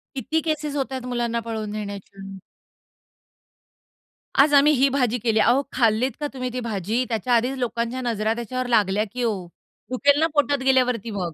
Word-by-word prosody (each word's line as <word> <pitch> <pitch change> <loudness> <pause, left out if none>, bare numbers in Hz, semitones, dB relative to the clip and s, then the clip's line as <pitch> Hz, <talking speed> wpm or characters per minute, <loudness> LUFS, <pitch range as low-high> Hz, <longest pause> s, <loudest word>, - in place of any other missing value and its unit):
किती 295 +5 -1
केसेस 305 -2 -2
होत 270 -2 -2
आहे 260 - -3
मुलांना 235 -1 -1
पळवून 215 -2 -4
नेण्याच्या? 200 -2 -7 2.0
आज 290 +2 +6
आम्ही 290 +2 +6
ही 275 +1 +3
भाजी 250 -3 +1
केली. 220 -1 +1
अहो, 245 +5 +4
खाल्लीत 235 +1 +2
का 295 - -3
तुम्ही 255 -1 -3
ती 250 - -2
भाजी? 220 +1 -1
त्याच्या 230 +2 -1
आधीच 250 +4 0
लोकांच्या 240 0 -2
नजरा 225 -3 0
त्याच्यावर 250 +2 -4
लागल्या, 210 -3 +2
की 250 0 -3
ओ. 195 -6 -2 0.4
दुखेल 285 +3 +3
ना 320 - +3
पोटात 290 -1 +2
गेल्यावरती 250 -4 +2
मग. 180 -5 -3
240 Hz, 165 wpm, -23 LUFS, 215-265 Hz, 2.0 s, आज